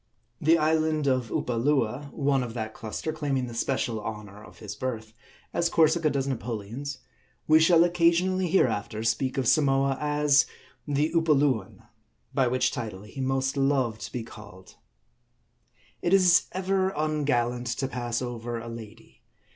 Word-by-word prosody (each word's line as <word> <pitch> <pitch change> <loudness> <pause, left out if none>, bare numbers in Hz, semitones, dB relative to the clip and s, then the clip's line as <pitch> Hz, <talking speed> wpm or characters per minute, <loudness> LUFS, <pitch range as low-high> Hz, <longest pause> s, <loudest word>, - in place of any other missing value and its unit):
The 165 +3 +5
island 155 -1 +1
of 130 -4 +1
Upolua, 125 +3 0
one 140 -2 +1
of 120 -2 -5
that 110 -2 -4
cluster, 115 +8 -5
claiming 140 -5 -1
the 120 - -8
special 115 -2 -1
honor 105 -1 -7
of - - -15
his 105 -2 -7
birth, 110 -3 -5 0.4
as 170 - +1
Cor 165 - +5
sica 160 -1 +1
does 135 -1 -1
Napoleon's, 125 +2 -4 0.5
we 155 0 +6
shall 165 +1 +6
occasionally 175 +2 +2
hereafter 110 - 0
speak 120 +4 0
of 130 -3 0
Samoa 135 -2 +2
as 150 -1 +3 0.4
the 145 +3 0
Upoluan; 145 - +1 0.5
by 130 -2 +2
which 125 +1 +1
title 105 -4 -6
he 110 +6 -8
most 135 +1 0
loved 135 -5 +1
to - - -6
be 120 - -4
called. 100 -5 -13 1.3
It 175 +3 +3
is 180 -2 +5
ever 190 0 0
ungallant 125 -6 0
to 135 - -1
pass 120 -1 -3
over 120 -1 -4
a 115 0 -7
lady. 115 -1 -11
135 Hz, 145 wpm, -27 LUFS, 115-155 Hz, 1.3 s, we